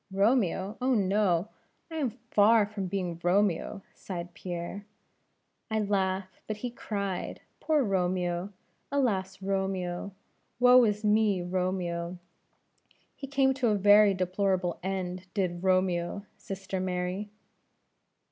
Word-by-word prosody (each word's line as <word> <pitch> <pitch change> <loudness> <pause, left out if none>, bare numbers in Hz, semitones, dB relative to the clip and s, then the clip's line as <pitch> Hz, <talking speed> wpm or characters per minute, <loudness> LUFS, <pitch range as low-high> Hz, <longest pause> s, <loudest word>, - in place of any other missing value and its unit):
"Romeo! 200 -1 +1
oh, 255 0 +2
no. 195 -2 +2 0.4
I 320 - -4
am 280 -5 +1
far 225 -2 +3
from 200 -2 -5
being 180 -3 -3
Romeo 195 +1 +1
" - - -34
sighed 175 -2 -7
Pierre. 175 +3 -5 0.9
"I 220 - 0
laugh, 190 -2 -1
but 215 - -3
he 245 +3 -4
cried; 200 -5 -4 0.2
poor 305 -3 +2
Romeo! 180 -2 0 0.4
alas 195 -9 0
Romeo! 190 -1 -2 0.5
woe 250 0 +7
is 210 0 -1
me, 210 -3 +3
Romeo! 180 -1 -2 1.0
he 275 - -7
came 270 -1 +3
to 260 -2 0
a 215 - +3
very 205 0 +6
deplorable 185 -1 0
end, 185 -1 -3
did 180 -3 -1
Romeo, 185 +1 +1
sister 195 -2 -5
Mary." 185 +2 -2
195 Hz, 120 wpm, -29 LUFS, 180-210 Hz, 1.0 s, woe